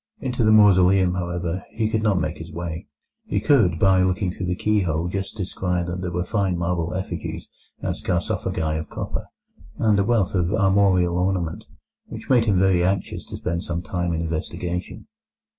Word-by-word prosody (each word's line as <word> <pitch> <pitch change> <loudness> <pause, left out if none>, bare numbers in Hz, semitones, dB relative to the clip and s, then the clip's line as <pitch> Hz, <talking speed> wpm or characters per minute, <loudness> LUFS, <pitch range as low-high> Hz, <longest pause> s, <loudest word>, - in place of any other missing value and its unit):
Into 125 -2 -1
the 110 - +4
mausoleum, 95 -3 +5
however, 85 0 -3
he 110 -1 0
could 110 0 0
not 105 -4 +2
make 80 0 -3
his 80 +1 -8
way. 85 +2 -5 0.4
He - - 0
could 110 - +3
by 95 +1 +4
looking 95 0 +1
through 90 0 -5
the 90 - 0
keyhole 90 -6 0
just 95 +4 -4
descry 90 -2 -2
that 85 +1 -4
there 90 - -2
were 90 0 -2
fine 95 -2 0
marble 85 0 -1
effigies 95 - -5 0.4
and - - -1
sarcophagi 80 -2 -1
of 80 - -7
copper, - - -5 0.5
and 105 -2 +3
a - - +4
wealth 105 -3 +1
of 90 -1 +1
armorial 95 -4 +3
ornament, 90 -3 -1 0.4
which - - -6
made 120 -3 +5
him 100 -4 +2
very 90 -2 +3
anxious 95 +1 -1
to - - -7
spend 85 +1 -2
some 85 0 -3
time 90 -1 -2
in 80 0 -1
investigation. 85 +2 -4
90 Hz, 175 wpm, -23 LUFS, 85-100 Hz, 0.5 s, mausoleum